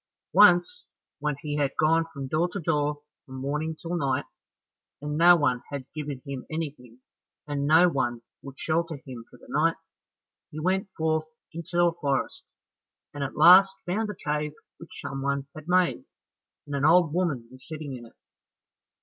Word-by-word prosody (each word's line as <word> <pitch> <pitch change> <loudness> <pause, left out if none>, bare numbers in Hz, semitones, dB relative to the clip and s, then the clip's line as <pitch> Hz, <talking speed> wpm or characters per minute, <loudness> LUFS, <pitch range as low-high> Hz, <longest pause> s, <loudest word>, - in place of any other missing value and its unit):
Once 180 -2 +5 0.3
when 150 0 -1
he 150 -1 -3
had 140 -2 0
gone 165 +1 +3
from 140 -2 -6
door 155 +6 0
to 200 - -4
door 150 -2 -1 0.2
from 130 - -10
morning 150 +4 -3
till 170 +1 -4
night, 135 -6 0 0.7
and 150 +1 -4
no 175 +3 +7
one 130 -6 +1
had 140 -2 -5
given 145 -4 -6
him 140 -2 -6
anything, 140 -7 -6 0.4
and 145 -1 -2
no 160 +4 +6
one 120 -7 -1 0.2
would 135 -1 -11
shelter 165 0 -1
him 125 -3 -8
for - - -16
the - - -18
night, 165 +3 +1 0.7
he 155 - -7
went 190 +4 0
forth 160 0 0 0.3
into 170 +1 -4
a 170 -1 +3
forest, 140 -5 -2 0.7
and 145 -1 -4
at 135 - -5
last 190 +4 +8
found 210 +5 -1
a 210 - -5
cave 150 -2 -3 0.3
which 170 - -11
someone 135 0 -2
had 155 0 -11
made, 180 +7 +2 0.6
and 145 -1 -5
an 140 - -1
old 165 0 +5
woman 160 -10 -1
was 130 0 -15
sitting 155 -4 -6
in 120 -2 -10
it. - - -21
150 Hz, 165 wpm, -26 LUFS, 140-170 Hz, 0.7 s, last